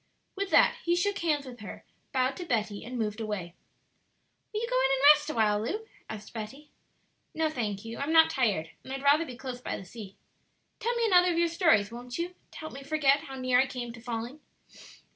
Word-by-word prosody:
With 395 0 -2
that - - +5
he 345 0 +2
shook 400 +3 0
hands 300 -4 0
with 245 -2 -10
her, 205 - -9 0.3
bowed 260 0 +1
to 360 - -5
Betty, 215 -9 -1
and 250 +1 -6
moved 215 -1 -2
away. 200 -6 -4 1.0
"Will 430 0 -2
you 470 - -2
go - - +1
in 270 - +3
and 270 0 +1
rest 295 0 -4
awhile, 215 -6 +2
Lu?" 425 - -3 0.2
asked 210 -1 -8
Betty. 250 +7 -8 0.6
"No, 315 -1 +1
thank 215 -6 -3
you; 225 0 -6
I'm 280 +3 -1
not 320 0 +6
tired; 205 - 0
and 260 - -9
I'd 270 0 -4
rather 295 +4 +4
be 250 -2 -8
close 255 -1 -6
by - - -3
the 195 - -9
sea. 200 0 -10 0.6
Tell 475 +1 -1
me 470 -1 +1
another 360 -4 +5
of 335 - -1
your 340 0 +3
stories, 325 - +3
won't 245 +1 -7
you? 345 +1 -3 0.2
to - - -13
help 315 - -7
me 275 - -8
forget 285 -1 +2
how 270 - -8
near 255 -1 +2
I 265 - +3
came 240 -3 -5
to 230 - -12
falling." 240 +4 -5
265 Hz, 220 wpm, -29 LUFS, 225-320 Hz, 1.0 s, not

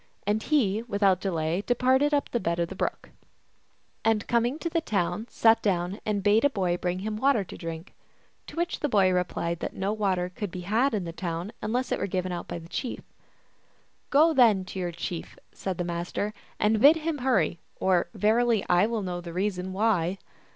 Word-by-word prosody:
And 210 +2 +1
he 225 -9 +1
without 200 -5 +1
delay 170 -1 -1
departed 260 +5 +2
up 290 -1 0
the 240 - 0
bed 170 -3 -1
of 170 0 0
the - - -7
brook; - - -3 0.9
and 220 -2 +2
coming 240 +4 +1
to 335 - -4
the 335 0 0
town, 200 - -1
sat 225 0 +4
down 185 0 -1
and 205 -2 0
bade 210 +2 +4
a 285 - +5
boy 185 -8 0
bring 180 0 -2
him 215 -1 -2
water 260 -3 +3
to 180 - -10
drink. 165 +2 -7 0.5
To - - -10
which 345 +1 -1
the 295 - -1
boy 195 -5 +4
replied 170 -2 -1
that - - -5
no 195 +2 -1
water 190 -4 0
could 205 - -3
be 180 +1 -7
had 225 +8 +1
in 200 - -1
that 165 0 -7
town 170 +3 -3
unless 250 +4 -1
it - - 0
were - - -1
given 185 -1 -2
out 175 -1 -5
by - - -4
the 165 -1 -10
chief. 245 +7 -4 0.6
" - - -39
Go 315 +4 +5
then 220 -9 +5
to 190 - -6
your 175 -1 -2
chief," 170 0 -6
said 190 -3 -4
the 175 - -1
Master, 175 +4 -3
" - - -31
and 215 0 +2
bid 290 +5 +8
him 320 -2 -2
hurry, 205 -11 +1 0.2
or, 185 -2 +2
verily, 225 0 +2
I 180 +4 +4
will 225 -2 -2
know 180 -1 -4
the 170 -1 -8
reason 185 0 -2
why." 190 -3 +1
200 Hz, 205 wpm, -27 LUFS, 180-235 Hz, 0.9 s, bid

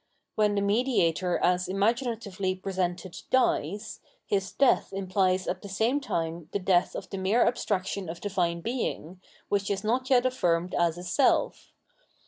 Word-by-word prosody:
When 210 -1 +2
the 200 - +1
mediator 200 -6 +1
as 180 0 +1
imaginatively 205 -2 -1
presented 185 -2 -3
dies, 210 - 0 0.3
his 195 -2 -1
death 275 - +3
imphes 185 -1 0
at 185 - -2
the 200 - -9
same 225 +8 +1
time 165 - -3
the - - +2
death 185 -2 +2
of 190 - -7
the 195 - -4
mere 200 +6 +3
abstraction 200 -5 -1
of 170 - -6
Divine 175 -4 -1
Being, 190 -6 -4 0.3
which 200 -1 0
is 200 0 -2
not 250 +4 0
yet 255 -2 +4
affirmed 180 -9 0
as 170 -1 +1
a 175 - -7
self. 185 +10 +1
195 Hz, 150 wpm, -27 LUFS, 180-220 Hz, 0.3 s, yet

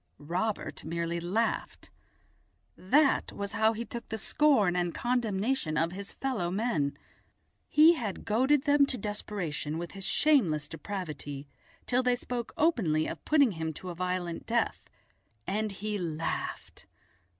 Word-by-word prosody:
Robert 180 +9 -2
merely 170 +1 -2
laughed. 195 +7 -2 0.8
That 275 +10 +3
was 200 0 -5
how 220 +1 +3
he 230 +2 -4
took 235 +2 -8
the 220 - -3
scorn 220 -7 +3
and 175 -1 0
condemnation 230 - 0
of 165 +2 +1
his 200 +2 -6
fellow 250 -10 -2
men. 175 -9 0 0.7
He 310 +3 +7
had 225 - -4
goaded 260 +6 +3
them 285 -1 +4
to 260 - -1
desperation 195 -8 -3
with 170 0 -5
his 195 -1 -6
shameless 185 - +3
depravity 150 -5 -6 0.4
till 250 +1 +2
they 250 -1 +2
spoke 245 -1 -4
openly 185 - +2
of - - -6
putting 285 -6 +4
him 160 -2 -3
to 180 +5 -7
a - - -5
violent 180 -1 -3
death, 235 +1 -1 0.6
and 215 +1 -1
he 205 +1 -3
laughed. 165 -2 -4
200 Hz, 140 wpm, -30 LUFS, 170-245 Hz, 0.8 s, He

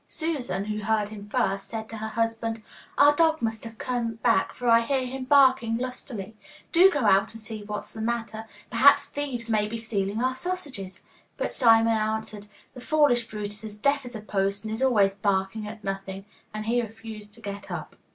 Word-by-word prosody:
Susan, 270 - -2
who 210 0 -3
heard 215 0 0
him 205 -1 -9
first, 195 -5 0
said 220 -1 -5
to 225 - -8
her 220 0 -4
husband, 225 0 -2 0.3
'Our 290 +1 +6
dog 320 0 +3
must 225 -3 -2
have 225 -1 -9
come 235 -2 -2
back, 225 -3 +1
for 245 - -4
I 230 0 +7
hear 260 +2 0
him 260 +1 -5
barking 260 -4 +5
lustily. 240 -4 -5 0.4
Do 360 +3 +7
go 290 -7 -1
out 195 0 +3
and - - -7
see 220 -1 -7
what's 210 0 -6
the 220 - -6
matter; 225 -1 -3 0.3
perhaps 280 +4 +6
thieves 275 -6 -4
may 215 -2 +1
be 230 +2 -4
stealing 215 -2 -2
our 255 0 +1
sausages.' 265 - -5 0.4
But - - -2
Simon 225 -2 +5
answered, 215 -1 -2 0.3
'The 250 - -10
foolish 255 -5 +3
brute 210 -1 -4
is 205 +1 -6
as 210 -1 -7
deaf 280 +5 +1
as 245 -1 -8
a 215 - -5
post 200 -1 -1
and 220 0 -4
is 225 - -4
always 210 -7 +4
barking 200 +1 -1
at 210 0 -9
nothing,' 195 0 -5 0.3
and 215 0 -5
he 240 +2 +2
refused 220 -2 -9
to 230 - -16
get 200 -1 -7
up. - - -6
225 Hz, 200 wpm, -26 LUFS, 210-250 Hz, 0.4 s, I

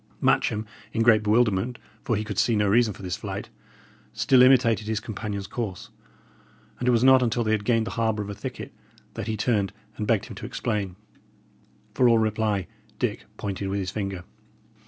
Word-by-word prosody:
Matcham, 110 0 +1 0.3
in 115 - +1
great 115 -2 +5
bewilderment, 110 +1 +2 0.3
for 115 - 0
he 105 - -1
could 105 -3 -3
see 115 - +3
no 105 -1 +2
reason 110 +2 +4
for 100 - -11
this 90 0 -3
flight, 100 -2 -6 0.6
still 130 -2 +4
imitated 120 -4 +5
his 110 -1 0
companion's 105 -3 -5
course; 105 -6 -5 0.9
and 125 - -2
it - - +5
was 120 0 +3
not 130 0 +7
until 120 -1 +1
they 110 - 0
had 110 -2 +1
gained 115 -1 +2
the - - -5
harbour 110 -2 0
of 100 - -8
a - - -4
thicket - - -7 0.4
that - - -5
he 110 -1 -2
turned 105 -4 +1 0.3
and 105 - -3
begged 110 -3 +2
him - - -9
to - - -7
explain. 100 -5 -2 1.0
For 125 -1 +4
all 115 - +5
reply, 110 -3 0 0.3
Dick - - -2
pointed 100 -1 -4
with 100 - -1
his 90 -2 -3
finger. 95 -3 -4
110 Hz, 190 wpm, -25 LUFS, 100-115 Hz, 1.0 s, not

